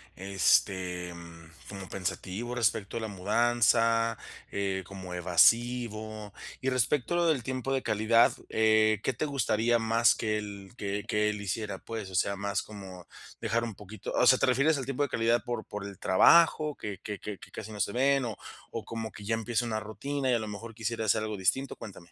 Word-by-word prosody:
este, 90 -1 +1
mm, 85 -1 -12 0.2
como 95 -2 -8
pensativo 100 +5 -4
respecto 110 -3 0
a - - -1
la 110 - -3
mudanza, 115 +2 +2 0.3
eh, 95 -1 -2
como 95 -2 -8
evasivo? 110 +3 +2 0.3
Y 130 - +1
respecto 130 +4 +1
a - - +2
lo 175 - +2
del 150 -6 +2
tiempo 130 +1 -2
de 135 - +1
calidad, 110 +1 +3 0.2
eh, 110 -1 +3
¿qué 130 - 0
te 155 - -2
gustaría 120 -4 +1
más 115 +1 +4
que 110 -1 -1
él 100 -2 -7
que 100 0 -3
que 105 0 +2
él 105 -1 -6
hiciera? 105 0 -3
Pues, 110 -4 -6
o - - -7
sea, 100 +3 +1
más 100 +1 -2
como 95 -4 -10 0.3
dejar 115 +1 0
un 115 -3 -4
poquito 105 +1 -8
o 125 - +3
sea, 130 - +7
¿te - - +2
refieres 140 +4 +3
al 130 - -4
tiempo 135 +1 -3
de 140 - -1
calidad 115 -1 +1
por 120 -3 -4
por 105 -1 -6
el 100 - -10
trabajo 155 - +5
que 100 -3 -6
que 105 -2 -5
que 105 -2 -6
que - - -13
casi 110 0 -8
no 105 - -8
se 100 - 0
ven, 135 +1 +2
o 110 -4 -5 0.3
o, 115 - -6
como 110 -1 -5
que 105 - -11
ya 115 - 0
empieza 120 +1 -1
una 110 -2 -1
rutina 135 +5 -3
y - - +3
a - - +1
lo 110 - -5
mejor 110 +2 -8
quisiera 115 0 -3
hacer 110 +1 +2
algo 110 -1 -3
distinto? 130 +9 0
Cuéntame. 90 -5 -11
110 Hz, 205 wpm, -29 LUFS, 100-120 Hz, 0.3 s, sea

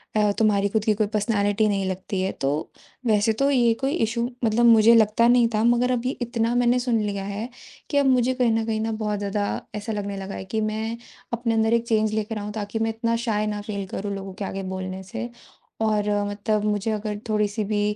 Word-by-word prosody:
अ, 210 -1 +3
तुम्हारी 200 -2 +3
ख़ुद 215 0 0
की 215 - +4
कोई 210 0 0
पर्सनालिटी 210 0 +1
नहीं 195 -2 0
लगती 185 +1 -3
है। 190 - 0
तो 135 +1 +2 0.6
वैसे 215 0 +3
तो 275 +5 +1
ये 240 -3 +4
कोई 270 +3 0
इशू 235 +2 -1 0.2
मतलब 230 +2 +3
मुझे 230 0 +7
लगता 225 +1 +4
नहीं 240 -1 +5
था, 215 - +2
मगर 240 +1 +3
अब 245 0 -1
ये 260 - +1
इतना 235 0 0
मैंने 245 0 +3
सुन 240 -3 +1
लिया 200 -2 -2
है 205 +5 -4 0.4
कि 285 - 0
अब 280 - +4
मुझे 255 -1 +3
कहीं 250 -3 +2
न 225 0 +1
कहीं 220 -1 -1
न 225 0 -1
बहुत 210 -2 -2
ज़्यादा 205 0 -1 0.3
ऐसा 210 +2 -4
लगने 200 -1 -4
लगा 195 0 -6
है 190 - -6
कि, 220 +3 -2
मैं 220 +2 -2 0.4
अपने 235 -1 0
अंदर 220 +1 +2
एक 235 0 +1
चेंज 215 -1 +2
लेकर 215 0 -2
आऊँ 210 0 -5
ताकि 215 +1 -4
मैं 225 0 +1
इतना 230 +1 -1
शाय 210 -1 +1
ना 210 -1 -3
फ़ील 200 -2 -4
करूँ 200 +1 -4
लोगों 195 -1 -7
के 195 +1 -5
आगे 195 0 -4
बोलने 185 0 -5
से। 235 +6 -6 0.5
और 210 -1 +1 0.2
मतलब 210 +1 -1
मुझे 210 +1 0
अगर 210 -1 -3
थोड़ी-सी 210 0 0
भी 205 0 +1
215 Hz, 225 wpm, -24 LUFS, 205-230 Hz, 0.6 s, मुझे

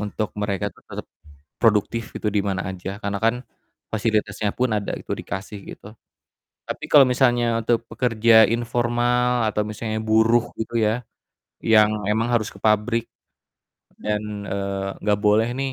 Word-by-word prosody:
untuk 105 +1 -3
mereka 100 -3 -2
tuh - - -23
tetep - - -7 0.6
produktif 115 +1 +2
gitu, - - -3
dimana 100 -2 0
aja. 95 +1 -6
Karena 100 -1 -2
kan, 115 +2 +3 0.6
fasilitasnya 105 -1 0
pun 125 0 +1
ada 105 -1 -1
gitu, - - -8
dikasih 100 +2 -6 0.2
gitu, 105 - -13 0.7
tapi - - -6
kalau 140 -2 +8
misalnya 120 -2 +2
untuk 115 +1 0
pekerja 115 -2 +4
informal 120 +1 +1
atau 105 -1 0
misalnya 110 +1 -4
buruh 110 +2 +3
gitu 115 +1 -2
ya, 110 +3 0 0.5
yang 110 -1 +4 0.2
memang 110 +3 +1
harus 115 -3 +1
ke - - -11
pabrik 110 +2 +1 0.9
dan, 105 -1 -3
eee, 100 0 -3
nggak 105 0 +1
boleh 105 +2 +4
nih, 135 0 -2
110 Hz, 140 wpm, -23 LUFS, 105-120 Hz, 0.9 s, kalau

